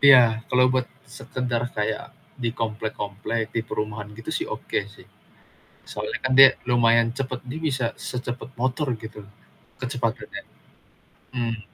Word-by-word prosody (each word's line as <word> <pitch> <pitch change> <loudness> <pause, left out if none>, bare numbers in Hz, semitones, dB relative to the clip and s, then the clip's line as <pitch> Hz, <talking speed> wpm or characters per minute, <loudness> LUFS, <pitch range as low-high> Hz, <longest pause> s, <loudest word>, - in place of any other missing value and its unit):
Iya, 120 -5 +7
kalau 125 0 +4
buat 130 -1 +1 0.2
sekedar 125 -2 -3
kayak 105 +1 -2 0.2
di 120 -1 0
komplek-komplek, 110 0 -2
di 115 - 0
perumahan 105 -1 -3
gitu, 115 - -6
sih, - - -1
oke, - - -2 0.2
sih. - - -15 0.9
Soalnya, - - -3
kan, 130 - +1
dia 135 0 +11 0.2
lumayan 115 -1 +4
cepet. 130 -2 -2
Dia 145 +6 -4
bisa 130 -3 0
secepat 125 0 -5
motor 130 +4 +1
gitu, 110 -1 -9 0.6
kecepatannya. 125 -3 -3 0.9
Mmm. 115 -2 -1
120 Hz, 130 wpm, -25 LUFS, 110-130 Hz, 0.9 s, dia